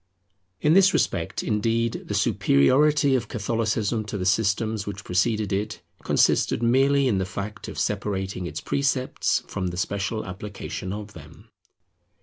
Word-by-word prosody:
In 150 - +4
this 195 +1 +6
respect, - - -1
indeed, 115 +2 0
the - - -2
superiority 140 - +3
of 130 - 0
Catholicism 110 -1 -1
to 105 - -4
the 90 - -3
systems 105 +2 +1
which 100 0 -6
preceded 105 +2 0
it, 105 -2 -3 0.2
consisted 120 - +2
merely 135 +3 +3
in 105 -6 +1
the - - 0
fact 105 +2 -6
of - - -8
separating 95 -3 -2
its 80 -1 -5
precepts 135 -2 0
from 95 - -3
the 90 0 -5
special 100 +4 -2
application 100 -1 -6
of 105 0 -6
them. 75 -2 -14
105 Hz, 140 wpm, -25 LUFS, 95-120 Hz, 0.2 s, this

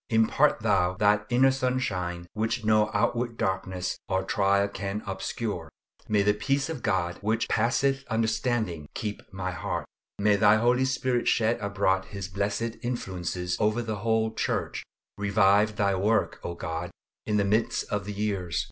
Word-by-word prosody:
Impart 110 0 +3
Thou 95 -4 +2
that 105 +1 +2
inner 130 +2 +5
sunshine 105 -10 -1
which 110 +1 -1
no 110 0 +4
outward 120 -1 0
darkness 95 -1 -2
or 95 0 +1
trial 100 +1 +2
can 100 +1 -4
obscure. 95 -2 -4 0.4
May 105 -2 +3
the 105 +1 +4
peace 135 +7 0
of 155 -6 -4
God, 85 -4 0
which 110 +2 0
passeth 135 +4 +1
understanding, 110 - -1
keep 105 -2 -4
my 95 -1 -3
heart. 80 - -3 0.3
May 100 0 +3
Thy 105 +1 +6
Holy 120 +3 +3
Spirit 130 -1 0
shed 115 0 +2
abroad 100 -2 0
His 100 -3 -6
blessed 100 +4 -2
influences 90 -7 -3
over 110 +3 +1
the 110 -2 -3
whole 110 +1 +1
Church. - - -2 0.4
Revive 100 +1 +3
Thy 100 -1 +2
work, 105 +4 +1
O 85 - -4
God, 80 -1 -4 0.4
in 105 - +1
the 100 - +2
midst 110 +3 +1
of 105 -2 -1
the 105 - -4
years. 100 -6 -1
105 Hz, 155 wpm, -27 LUFS, 95-115 Hz, 0.4 s, Thy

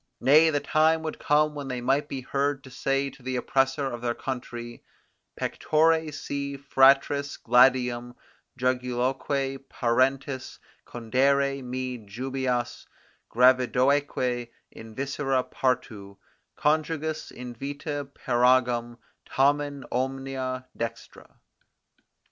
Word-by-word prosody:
Nay, 155 +4 +6
the 145 -2 +1
time 160 +2 +2
would 155 - -5
come 150 +1 +2
when 145 -2 -6
they 125 -2 -3
might 135 +4 +1
be 135 -2 -5
heard 140 +1 -1
to 130 - -13
say 135 +2 -1
to 135 - -18
the 130 +1 -3
oppressor 135 +2 +1
of 120 -3 -4
their 120 -1 -1
country: 120 -2 -6 0.6
Pectore 160 0 +1
si 140 -1 -4
fratris 140 +1 +3
gladium 125 0 +3 0.4
juguloque 130 +2 -1
parentis 130 +2 0 0.3
Condere 135 +4 +1
me 125 0 -4
jubeas, 125 +3 -3 0.4
gravidoeque 125 0 +2 0.2
in 110 -1 -12
viscera 135 -1 -1
partu 110 -8 -3 0.4
Conjugis, 155 0 -1
in 125 0 -8
vita 145 +3 -5
peragam 120 -2 +2 0.3
tamen 145 0 +1
omnia 130 0 -3
dextra. 115 -1 -7
130 Hz, 100 wpm, -26 LUFS, 125-140 Hz, 0.6 s, Nay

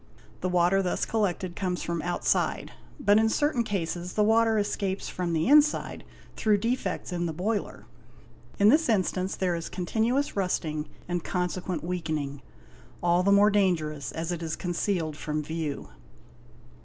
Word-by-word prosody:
The 185 - -1
water 180 +2 +3
thus 180 -2 -1
collected 185 -5 -1
comes 180 -2 -2
from 170 -1 -2
outside, 175 +2 0 0.3
but 205 -6 +4
in 220 0 +3
certain 290 -1 +1
cases 180 -3 -3
the 210 - +2
water 225 +1 +4
escapes 200 -2 -1
from 180 -2 -3
the 160 -1 +1
inside 300 +2 +3 0.3
through 215 -2 +2
defects 205 -4 -2
in 175 -1 -1
the 160 - -3
boiler. 200 +6 -3 0.7
In 205 +1 +6
this 305 +3 +4
instance 190 -3 0
there 185 -2 0
is 165 0 -5
continuous 225 +9 0
rusting 160 -6 -1 0.2
and 175 -1 -2
consequent 180 -2 -2
weakening, 155 -5 -3 0.6
all 175 +1 +3
the 200 +2 +2
more 205 +1 +6
dangerous 160 -8 0
as 165 +2 -4
it 170 -1 -3
is 160 -1 -3
concealed 175 -3 -2
from 150 -1 -3
view. 160 -2 -4
180 Hz, 150 wpm, -27 LUFS, 170-205 Hz, 0.7 s, In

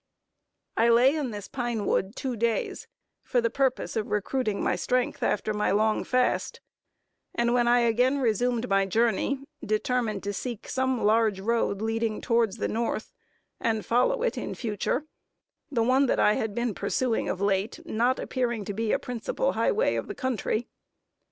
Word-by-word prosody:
I 230 +1 +4
lay 250 +5 +5
in 295 -5 -1
this 205 -2 -7
pine 240 -5 -2
wood 190 +5 0
two 260 -3 -3
days, 230 0 -1 0.3
for 250 - 0
the 230 -1 0
purpose 265 -1 0
of 220 -2 -2
recruiting 215 0 -1
my - - +1
strength, 250 +7 -1
after 215 +1 0
my 210 0 0
long 215 +3 +2
fast; 255 0 0 0.8
and 235 0 +2
when 240 -1 +3
I 240 0 +5
again 245 +4 +3
resumed 245 0 +1
my 195 -1 +2
journey, 230 +6 +1 0.2
determined 215 -1 -1
to 205 0 -2
seek 235 +1 -5
some 260 -2 0
large 215 -1 +3
road 215 -1 0
leading 225 -1 -1
towards 230 -4 +1
the - - -1
North, 230 - -2 0.5
and 220 -2 -1
follow 470 - +2
it - - 0
in - - -5
future; 230 +5 -2 0.6
the 240 -6 +1
one 260 +3 +3
that - - +1
I 210 - +5
had 215 -1 -2
been 235 -2 -1
pursuing 245 +1 -1
of 185 - -2
late, 200 +6 0
not 245 -2 +1
appearing 240 -5 -2
to 205 - -4
be 220 +2 -1
a - - +3
principal 250 - -2
high - - +1
way 455 +4 +1
of - - -3
the 405 - -6
country. 240 -2 -1
235 Hz, 170 wpm, -27 LUFS, 215-250 Hz, 0.8 s, lay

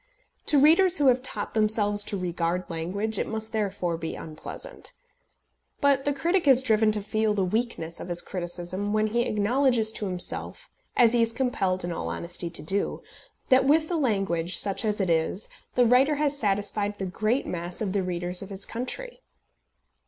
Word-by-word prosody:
To 295 - +5
readers 340 +6 +6
who 290 - +2
have 250 0 +2
taught 220 -5 -4
themselves 210 -1 +2
to 200 - -3
regard 175 0 -2
language, 200 +6 -2
it - - -1
must 220 0 -3
therefore 190 -6 -2
be 165 -1 -5
unpleasant. 165 - -7 0.9
But 280 -2 +2
the 290 - +2
critic 335 +5 0
is 260 -1 +6
driven 220 -2 +3
to 210 -1 -1
feel 215 0 0
the 195 -2 +1
weakness 185 -5 -3
of - - -7
his 175 -1 -1
criticism, 180 +2 -4
when 215 0 +2
he 230 +3 0
acknowledges 225 +1 +2
to 210 -2 -4
himself 185 - -1 0.3
as 235 -1 +5
he 240 - +3
is 230 0 +2
compelled 200 -7 -1
in 175 - -3
all 170 - -4
honesty 170 0 -3
to 170 - -5
do 195 +6 -1 0.5
that 260 0 +5
with 310 +3 +3
the 350 - -1
language, 195 - +2
such 200 +2 +3
as 210 -1 -1
it 185 -3 +1
is, 165 +5 0 0.3
the 245 - +4
writer 260 +5 +4
has 290 -1 +1
satisfied 205 -3 -1
the 195 - -3
great 215 +8 -1
mass 175 0 -5
of 200 -4 -2
the 200 - +1
readers 180 0 -3
of 195 - -8
his 195 0 -3
country. 480 - -6
210 Hz, 180 wpm, -26 LUFS, 185-250 Hz, 0.9 s, readers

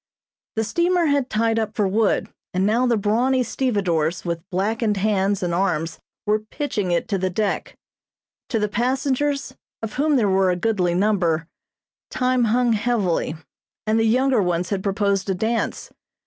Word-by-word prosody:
The 220 - +1
steamer 345 +8 +1
had 285 -3 +1
tied 225 +1 +1
up 220 -1 -3
for 205 -3 +2
wood, 210 +2 +1 0.3
and 185 +1 +2
now 235 +5 +2
the 235 -2 +2
brawny 240 +6 +2
stevedores 185 - 0
with 170 -1 -2
blackened 210 +3 0
hands 200 -1 +1
and 175 -1 -1
arms 165 -3 -1 0.3
were 210 +1 +2
pitching 215 -3 -3
it 175 -1 0
to 195 -3 0
the 185 +1 0
deck. 200 +2 -2 0.7
To 230 - 0
the 210 -1 +1
passengers, 265 +4 0 0.3
of 220 - -4
whom 295 +2 +2
there 230 -6 +3
were 190 -1 +3
a 180 - +2
goodly 180 -3 0
number, 175 -5 +1 0.6
time 255 -1 +1
hung 240 +1 +2
heavily, 205 -8 0 0.5
and 220 +1 +2
the 225 - +2
younger 255 +1 +3
ones 180 0 -1
had 195 -2 0
proposed 200 0 0
a 190 - +1
dance. 225 +5 -2
215 Hz, 160 wpm, -22 LUFS, 190-240 Hz, 0.7 s, there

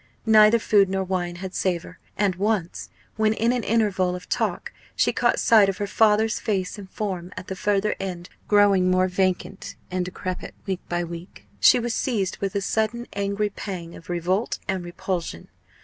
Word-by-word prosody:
Neither 215 0 +7
food 205 -3 +3
nor 190 0 0
wine 180 -2 -2
had 185 +1 -7
savour; 180 -1 -2 0.2
and 200 -3 +2
once, 195 -2 -1 0.3
when 215 0 +3
in 230 +2 +1
an 245 -2 -1
interval 195 -5 +1
of 180 - -9
talk - - -2 0.2
she - - +2
caught - - +2
sight 215 -4 +5
of 190 - -3
her 205 - -2
father's 215 +1 +3
face 195 -1 -2
and 195 -2 -10
form 185 -4 -4
at 185 - -7
the 190 - -3
further 205 +1 +1
end, 180 -2 -5 0.2
growing 200 -3 +4
more 185 0 +3
vacant 185 +1 -2 0.2
and 185 0 0
decrepit 185 0 -5
week 190 -3 -3
by 175 0 0
week, 170 - -9
she 95 - +7
was 240 0 -2
seized 210 -8 -1
with 195 -1 -3
a 200 - +1
sudden 220 +4 -1
angry 200 +1 -1
pang 175 -5 -6
of 165 - -14
revolt 180 +5 0
and 190 -2 -1
repulsion. 175 - -4
190 Hz, 180 wpm, -24 LUFS, 180-210 Hz, 0.3 s, Neither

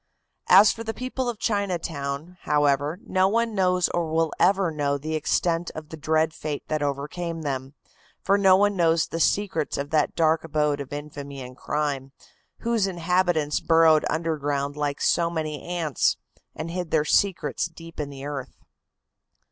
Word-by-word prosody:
As 205 - +8
for 230 - -6
the 225 0 -4
people 255 0 -3
of 235 - -4
Chinatown, 170 -6 -2
however, 145 +2 +1
no 185 0 +2
one 230 +2 +1
knows 180 -2 +2
or 170 -2 -2
will 160 0 +1
ever 190 -1 +3
know 145 -2 0
the 155 +3 -5
extent 165 +2 0
of 155 -1 -8
the - - -7
dread 160 +1 +1
fate 150 -2 -5
that 155 -1 -1
overcame 155 +4 -3
them, 135 -1 -4 0.4
for 195 - +2
no 195 -2 +6
one 205 +1 +2
knows 165 -2 +3
the 165 - -5
secrets 175 -3 0
of 140 +1 -4
that 155 -2 +1
dark 160 -1 +2
abode 150 -2 0
of 135 - -8
infamy 145 -1 -7
and 125 0 -10
crime, 140 -2 -3 0.5
whose 230 -4 +1
inhabitants 175 -4 +1
burrowed 160 -2 +5
underground 145 -3 -1
like 145 -1 -2
so 170 -1 +2
many 155 -4 -3
ants; 170 -6 0 0.4
and 165 +1 -5
hid 180 -1 -4
their 155 -1 +2
secrets 190 0 +1
deep 165 0 -13
in 145 -1 -3
the 140 -1 -8
earth. 140 -3 -6
160 Hz, 165 wpm, -25 LUFS, 145-180 Hz, 0.5 s, As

